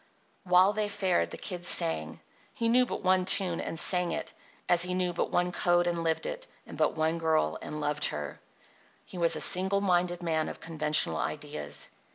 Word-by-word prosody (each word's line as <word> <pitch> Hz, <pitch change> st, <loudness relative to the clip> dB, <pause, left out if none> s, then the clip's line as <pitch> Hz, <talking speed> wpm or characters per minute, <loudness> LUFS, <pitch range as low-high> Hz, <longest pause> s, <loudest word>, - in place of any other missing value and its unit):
While 185 Hz, +2 st, +4 dB
they 210 Hz, -1 st, -2 dB
fared 190 Hz, -3 st, 0 dB
the -, -, -9 dB
Kid 180 Hz, -3 st, -7 dB
sang. 160 Hz, -, +1 dB, 0.3 s
He 230 Hz, -, -1 dB
knew 250 Hz, +2 st, +3 dB
but -, -, -6 dB
one 185 Hz, 0 st, +2 dB
tune 180 Hz, -2 st, +1 dB
and 165 Hz, -, -5 dB
sang 180 Hz, 0 st, +2 dB
it, -, -, -6 dB, 0.3 s
as 175 Hz, -1 st, +4 dB
he 180 Hz, +1 st, 0 dB
knew 180 Hz, -1 st, -1 dB
but 175 Hz, -, -2 dB
one 180 Hz, 0 st, 0 dB
code 175 Hz, 0 st, +1 dB
and 170 Hz, -1 st, -2 dB
lived 160 Hz, -1 st, -1 dB
it, -, -, -6 dB, 0.2 s
and -, -, -11 dB
but -, -, 0 dB
one 160 Hz, +1 st, 0 dB
girl 160 Hz, -1 st, 0 dB
and 150 Hz, -, -7 dB
loved 150 Hz, 0 st, -1 dB
her. 75 Hz, -1 st, -5 dB, 0.7 s
He 180 Hz, -, -10 dB
was 170 Hz, -1 st, +3 dB
a -, -, -4 dB
single 190 Hz, +2 st, +5 dB
minded 175 Hz, -2 st, 0 dB
man 160 Hz, -2 st, -1 dB
of -, -, -9 dB
conventional 155 Hz, -2 st, +1 dB
ideas. 145 Hz, -, -6 dB
175 Hz, 195 wpm, -28 LUFS, 160-185 Hz, 0.7 s, single